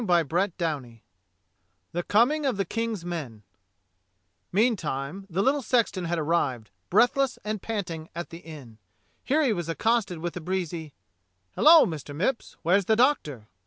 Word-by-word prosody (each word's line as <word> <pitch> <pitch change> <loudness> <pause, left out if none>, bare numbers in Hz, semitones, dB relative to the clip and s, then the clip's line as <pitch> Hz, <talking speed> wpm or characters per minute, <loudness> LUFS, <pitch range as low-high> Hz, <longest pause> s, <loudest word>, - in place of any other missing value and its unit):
CHAPTER 175 0 +2
III 135 -9 -3 0.9
THE 175 - -2
COMING 265 - +2
OF 255 - 0
THE 195 - 0
KING's 225 -2 -3
MEN 140 -12 -5 1.1
MEANTIME 190 - -1
the 190 +3 0
little 275 +5 +2
sexton 220 -6 +1
had 170 +1 -1
arrived, 145 -9 -1 0.2
breathless 245 +6 +3
and 215 -2 -3
panting, 170 -8 -4
at 170 0 -6
the 165 - -8
inn. 145 -10 -12 0.4
Here 305 +4 +2
he 250 -6 +2
was 175 -4 -4
accosted 200 +2 0
with 170 +1 -5
a 180 - -5
breezy, 170 -3 -3 0.6
"Hello, 320 +1 +8
Mr. 150 -3 -6
Mipps, 230 - -2
where's 185 +4 +3
the 220 - +3
Doctor?" 155 - +1
175 Hz, 145 wpm, -26 LUFS, 160-225 Hz, 1.1 s, Hello